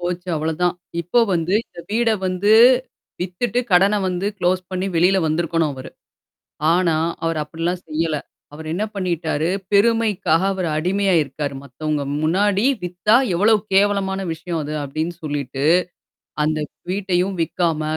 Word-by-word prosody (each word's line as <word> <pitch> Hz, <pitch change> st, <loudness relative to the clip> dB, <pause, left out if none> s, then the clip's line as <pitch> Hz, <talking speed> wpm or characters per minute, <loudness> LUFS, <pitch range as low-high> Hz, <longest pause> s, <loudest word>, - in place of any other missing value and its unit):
போச்சு. 175 Hz, +1 st, -4 dB
அவ்ளதான். 160 Hz, +3 st, 0 dB, 0.3 s
இப்போ 180 Hz, +8 st, +2 dB
வந்து 170 Hz, +1 st, -1 dB
இந்த -, -, -12 dB
வீட 230 Hz, +1 st, +2 dB, 0.2 s
வந்து, 185 Hz, +3 st, +1 dB, 0.7 s
வித்துட்டு 190 Hz, +7 st, -1 dB
கடன 195 Hz, +4 st, +5 dB
வந்து 185 Hz, +1 st, -2 dB
குளோஸ் 185 Hz, 0 st, +1 dB
பண்ணி 185 Hz, 0 st, -2 dB
வெளில 180 Hz, +4 st, +4 dB
வந்திருக்கணும் 160 Hz, -1 st, 0 dB
அவரு. 130 Hz, -1 st, -9 dB, 0.8 s
ஆனா, 170 Hz, -2 st, +2 dB, 0.3 s
அவர் 165 Hz, -1 st, 0 dB
அப்பிடிலாம் 170 Hz, +4 st, -3 dB
செய்யல. 155 Hz, 0 st, -1 dB, 0.4 s
அவர் 160 Hz, +1 st, -9 dB
என்ன 190 Hz, +6 st, -1 dB
பண்ணிட்டாரு, 170 Hz, -4 st, -1 dB, 0.2 s
பெருமைக்காக 200 Hz, -5 st, +3 dB
அவர் 185 Hz, -3 st, -2 dB
அடிமையா 190 Hz, +4 st, +1 dB
இருக்காரு. 140 Hz, 0 st, -5 dB
மத்தவங்க 145 Hz, +2 st, -3 dB, 0.2 s
முன்னாடி 195 Hz, +6 st, +2 dB, 0.2 s
வித்தா, 180 Hz, +5 st, +2 dB, 0.2 s
எவ்வளவு 210 Hz, +5 st, +4 dB, 0.2 s
கேவலமான 195 Hz, -1 st, +2 dB
விஷயம் 165 Hz, 0 st, -4 dB
அது 150 Hz, +1 st, -5 dB
அப்பிடின்னு 155 Hz, +5 st, -3 dB
சொல்லிட்டு, 140 Hz, -2 st, -3 dB, 0.8 s
அந்த 155 Hz, 0 st, 0 dB, 0.3 s
வீட்டையும் 190 Hz, -1 st, 0 dB
விக்காம, 165 Hz, -1 st, -1 dB
175 Hz, 125 wpm, -21 LUFS, 160-190 Hz, 0.8 s, கடன